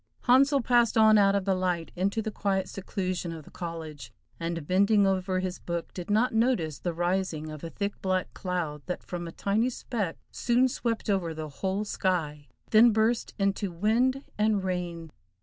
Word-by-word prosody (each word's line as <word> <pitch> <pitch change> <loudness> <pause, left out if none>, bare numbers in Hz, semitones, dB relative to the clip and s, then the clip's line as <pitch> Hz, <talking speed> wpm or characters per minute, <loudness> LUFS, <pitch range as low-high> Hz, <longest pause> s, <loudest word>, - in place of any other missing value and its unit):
Handsel 275 +3 +4
passed 240 -2 +3
on 215 -1 +7
out 200 0 +4
of 200 -2 0
the 195 - +2
light 180 -3 -1
into 200 +5 0
the 220 - -3
quiet 195 -2 -1
seclusion 185 -3 -3
of 160 -3 -8
the - - -15
college, 160 -8 -7 0.3
and 165 -2 -3
bending 200 +4 +4
over 185 -1 0
his 185 -1 -4
book 170 -1 -4
did 180 0 -7
not 220 +4 +2
notice 220 - +1
the 175 - -2
rising 175 -2 -1
of 155 0 -9
a 165 - -4
thick, 200 +4 -4
black 185 -1 -1
cloud 175 -6 -3
that 180 - -4
from 175 -1 -5
a - - -6
tiny 215 +8 0
speck 220 -8 -3
soon 245 +2 +2
swept 235 -3 -2
over 185 -6 0
the 155 -1 -5
whole 190 +8 -2
sky, 155 -8 -1 0.2
then 225 +2 +7
burst 225 +2 +1
into 195 -1 0
wind 235 +9 +1 0.2
and 210 -2 +2
rain. 175 -3 -3
190 Hz, 180 wpm, -28 LUFS, 170-215 Hz, 0.3 s, on